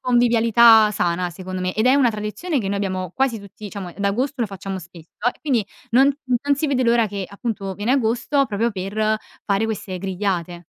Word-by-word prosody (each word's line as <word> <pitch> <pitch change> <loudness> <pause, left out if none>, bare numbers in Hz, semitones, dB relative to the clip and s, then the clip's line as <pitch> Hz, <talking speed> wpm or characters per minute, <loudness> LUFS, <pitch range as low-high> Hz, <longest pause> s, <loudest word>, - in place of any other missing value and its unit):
convivialità 235 -2 +5
sana 180 -2 0
secondo 185 +1 -6
me 185 0 -2
ed 220 +3 +1
è 260 - +6
una 275 -4 +4
tradizione 215 - -3
che 205 - -3
noi 200 - -1
abbiamo 185 -3 -2
quasi 265 -4 +1
tutti 200 +1 -13
diciamo, 195 -3 -6
da 200 0 +1
agosto 255 +6 -2
lo 230 - +1
facciamo 195 -1 -6
spesso, 170 -2 -13 0.3
quindi 255 -8 +1 0.3
non 265 +4 +5 0.3
non 285 0 +2
si 295 +3 -1
vede 270 -3 +1
l'ora 235 -1 +3
che, 200 -2 -4
appunto, 200 -2 -4
viene 210 +6 0
agosto 265 +2 +1
proprio 225 +3 0
per 215 +3 -1 0.3
fare 200 +1 +1
queste 200 -4 -4
grigliate. 180 -2 -3
210 Hz, 190 wpm, -21 LUFS, 190-240 Hz, 0.3 s, è